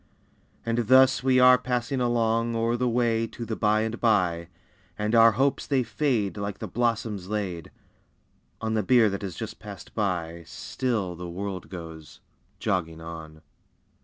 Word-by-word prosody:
And 115 Hz, -1 st, 0 dB
thus 130 Hz, +1 st, +6 dB
we 130 Hz, 0 st, +3 dB
are 125 Hz, -1 st, +7 dB
passing 125 Hz, +1 st, -2 dB
along 115 Hz, -1 st, +1 dB
O'er 115 Hz, +1 st, +1 dB
the 125 Hz, +1 st, 0 dB
way 115 Hz, -1 st, +1 dB
to 115 Hz, -, -7 dB
the 110 Hz, -, -3 dB
"by 110 Hz, 0 st, +2 dB
and 110 Hz, +1 st, -3 dB
by," 90 Hz, -7 st, +1 dB, 0.5 s
And 105 Hz, +1 st, -1 dB
our 115 Hz, -1 st, +7 dB
hopes 135 Hz, +5 st, 0 dB
they 135 Hz, -3 st, +2 dB
fade 115 Hz, -5 st, -1 dB
Like 100 Hz, -1 st, -4 dB
the -, -, -6 dB
blossoms 115 Hz, -5 st, -1 dB
laid 95 Hz, -6 st, -3 dB, 0.9 s
On 110 Hz, 0 st, -1 dB
the 110 Hz, -, +2 dB
bier 115 Hz, 0 st, +4 dB
that 100 Hz, -, -4 dB
has 95 Hz, -4 st, -5 dB
just -, -, -7 dB
passed -, -, -10 dB
by, 85 Hz, -5 st, -2 dB
Still 105 Hz, -4 st, -3 dB
the 90 Hz, +1 st, -7 dB
world 95 Hz, +1 st, -5 dB
goes 80 Hz, -4 st, -9 dB, 0.4 s
"jogging 80 Hz, -4 st, -2 dB
on." 80 Hz, -1 st, -9 dB
110 Hz, 160 wpm, -26 LUFS, 90-120 Hz, 0.9 s, are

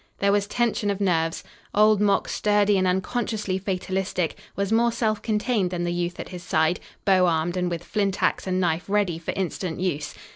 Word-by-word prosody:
There 200 Hz, 0 st, +2 dB
was 200 Hz, 0 st, +1 dB
tension 230 Hz, -3 st, 0 dB
of 200 Hz, -1 st, -1 dB
nerves. 165 Hz, -4 st, 0 dB, 0.3 s
Old 210 Hz, 0 st, +5 dB
Mok, 205 Hz, -1 st, +2 dB
sturdy 205 Hz, -1 st, +2 dB
and 185 Hz, -1 st, +2 dB
unconsciously 195 Hz, +1 st, -1 dB
fatalistic, 185 Hz, -2 st, -2 dB, 0.2 s
was 200 Hz, +1 st, -1 dB
more 235 Hz, +1 st, +3 dB
self 220 Hz, -2 st, 0 dB
contained 215 Hz, -3 st, 0 dB
than 175 Hz, -1 st, -3 dB
the 175 Hz, 0 st, -1 dB
youth 175 Hz, 0 st, -2 dB
at -, -, -6 dB
his 180 Hz, -1 st, -7 dB
side, 160 Hz, 0 st, +1 dB, 0.3 s
bow 185 Hz, -2 st, +5 dB
armed 165 Hz, +1 st, 0 dB
and 180 Hz, -1 st, 0 dB
with 170 Hz, -1 st, -4 dB
flint 200 Hz, -1 st, -1 dB
ax -, -, +1 dB
and 185 Hz, 0 st, 0 dB
knife 175 Hz, -1 st, 0 dB
ready 200 Hz, -5 st, +1 dB
for 165 Hz, -, -9 dB
instant 185 Hz, -2 st, -3 dB
use. 150 Hz, -5 st, -2 dB
190 Hz, 190 wpm, -25 LUFS, 175-205 Hz, 0.3 s, Old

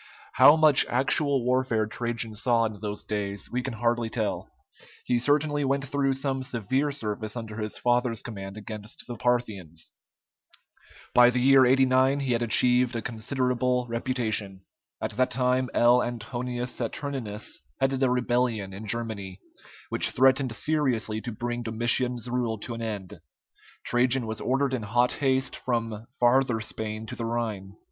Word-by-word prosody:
How 145 Hz, -, +8 dB
much 155 Hz, -3 st, +6 dB
actual 135 Hz, +1 st, +1 dB
warfare 125 Hz, -3 st, +1 dB
Trajan 115 Hz, 0 st, -3 dB
saw 115 Hz, +1 st, +2 dB
in 110 Hz, -2 st, -5 dB
those 105 Hz, -1 st, -4 dB
days 100 Hz, -1 st, -4 dB
we 125 Hz, -, -1 dB
can 130 Hz, 0 st, -5 dB
hardly 115 Hz, 0 st, 0 dB
tell; 110 Hz, -2 st, -3 dB, 0.6 s
he 120 Hz, -, +1 dB
certainly 145 Hz, +3 st, +1 dB
went 140 Hz, +1 st, 0 dB
through 135 Hz, 0 st, +1 dB
some 135 Hz, 0 st, -2 dB
severe 130 Hz, +4 st, -1 dB
service 110 Hz, -4 st, -4 dB
under 110 Hz, -2 st, -7 dB
his 105 Hz, -1 st, -3 dB
father's 120 Hz, -2 st, 0 dB
command 100 Hz, -3 st, -7 dB
against 105 Hz, 0 st, -8 dB
the 120 Hz, -, -6 dB
Parthians. 105 Hz, -9 st, -2 dB, 1.2 s
By 125 Hz, 0 st, +7 dB
the 125 Hz, 0 st, 0 dB
year 135 Hz, 0 st, +6 dB
89 130 Hz, +1 st, +3 dB
he 135 Hz, -2 st, -1 dB
had 115 Hz, -, 0 dB
achieved 125 Hz, +2 st, +3 dB
a 115 Hz, -, -3 dB
considerable 125 Hz, +1 st, -1 dB
reputation. 115 Hz, -5 st, -2 dB, 0.4 s
At -, -, -3 dB
that 130 Hz, 0 st, +2 dB
time 125 Hz, 0 st, +1 dB
L. 120 Hz, +1 st, +4 dB
Antonius 120 Hz, +1 st, -4 dB
Saturninus 120 Hz, -3 st, -4 dB, 0.2 s
headed 135 Hz, 0 st, 0 dB
a 130 Hz, -, +3 dB
rebellion 120 Hz, -5 st, 0 dB
in 105 Hz, +3 st, -8 dB
Germany, 105 Hz, -4 st, -4 dB, 0.5 s
which -, -, +3 dB
threatened 130 Hz, -1 st, +3 dB
seriously 120 Hz, -6 st, 0 dB
to 120 Hz, -, -5 dB
bring 120 Hz, +2 st, -4 dB
Domitian's 120 Hz, +1 st, 0 dB
rule 120 Hz, -2 st, -1 dB
to 120 Hz, -, -5 dB
an 115 Hz, -, -6 dB
end. 100 Hz, -7 st, -6 dB, 0.6 s
Trajan 125 Hz, +1 st, +3 dB
was 110 Hz, 0 st, -4 dB
ordered 135 Hz, +1 st, 0 dB
in 130 Hz, -, -1 dB
hot 120 Hz, +4 st, +1 dB
haste 130 Hz, -1 st, 0 dB
from 115 Hz, -3 st, -3 dB
Farther 125 Hz, -1 st, +3 dB
Spain 110 Hz, 0 st, -4 dB
to -, -, -7 dB
the 115 Hz, -, -4 dB
Rhine. 110 Hz, -5 st, -3 dB
120 Hz, 150 wpm, -26 LUFS, 110-130 Hz, 1.2 s, How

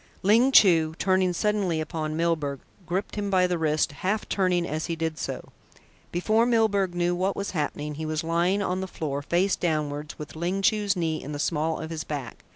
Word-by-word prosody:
Ling 230 Hz, +7 st, +5 dB
Chu, 165 Hz, -9 st, +5 dB
turning 185 Hz, -1 st, +2 dB
suddenly 195 Hz, -3 st, 0 dB
upon 155 Hz, -1 st, -3 dB
Milburgh, 155 Hz, -5 st, 0 dB, 0.3 s
gripped 190 Hz, +4 st, -3 dB
him 205 Hz, -1 st, -1 dB
by 185 Hz, -2 st, +4 dB
the 180 Hz, -2 st, -1 dB
wrist, 155 Hz, -2 st, +1 dB
half 190 Hz, +9 st, -2 dB
turning 180 Hz, -3 st, +1 dB
as 155 Hz, +2 st, -3 dB
he 165 Hz, -, -2 dB
did 160 Hz, -1 st, -3 dB
so. -, -, -5 dB, 0.6 s
Before 215 Hz, +6 st, +2 dB
Milburgh 205 Hz, -6 st, +2 dB
knew 175 Hz, 0 st, +1 dB
what 185 Hz, +2 st, 0 dB
was 200 Hz, 0 st, -3 dB
happening, 150 Hz, -2 st, -3 dB
he 155 Hz, +2 st, -5 dB
was 155 Hz, +1 st, -2 dB
lying 175 Hz, +5 st, +1 dB
on 185 Hz, -1 st, -1 dB
the 190 Hz, -, -3 dB
floor, 145 Hz, -5 st, -4 dB
face 175 Hz, +6 st, +1 dB
downwards, 150 Hz, -3 st, -2 dB
with 150 Hz, +1 st, -8 dB
Ling 180 Hz, +4 st, -2 dB
Chu's 205 Hz, -1 st, +2 dB
knee 160 Hz, -3 st, -1 dB
in 150 Hz, -, -6 dB
the -, -, -3 dB
small 160 Hz, +1 st, -1 dB
of 160 Hz, -, -6 dB
his 160 Hz, -1 st, -4 dB
back. 140 Hz, -6 st, -6 dB
170 Hz, 195 wpm, -26 LUFS, 155-190 Hz, 0.6 s, Ling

